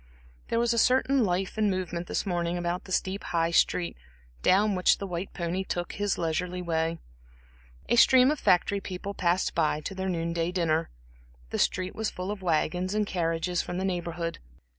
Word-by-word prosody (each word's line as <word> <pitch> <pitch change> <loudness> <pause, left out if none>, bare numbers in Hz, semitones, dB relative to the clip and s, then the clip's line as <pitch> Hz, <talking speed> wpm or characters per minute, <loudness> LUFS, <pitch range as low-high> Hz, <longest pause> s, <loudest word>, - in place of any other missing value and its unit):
There 230 - -1
was 235 0 +2
a 230 - +2
certain 260 +2 +3
life 190 +2 -1
and 210 -1 +3
movement 175 -2 -3
this - - -2
morning 175 -2 -1
about 175 +1 -2
the - - -11
steep 190 +2 -1
High 165 -1 0
Street, 170 +1 +2 0.5
down 205 +2 +4
which 185 -1 +3
the 200 - -5
white 180 0 -4
pony 175 +2 -2
took 175 -2 -3
his 205 -1 -1
leisurely 175 +2 -2
way. 165 -1 -1 0.9
A - - +3
stream 255 +3 +7
of 305 - -2
factory 200 +3 +3
people 190 +2 -5
passed 180 -1 +1
by 155 -2 +1
to 195 - -5
their 190 0 -3
noon 170 -1 -1
day 170 +1 -1
dinner; 165 -3 0 0.6
the - - -2
street 185 0 0
was 220 -1 -2
full 185 +2 -5
of 210 -2 -6
wagons 180 +2 0
and 215 0 +2
carriages 170 -1 -1
from 175 - -5
the 190 - -1
Neighborhood. 170 -2 -3
180 Hz, 185 wpm, -28 LUFS, 170-195 Hz, 0.9 s, stream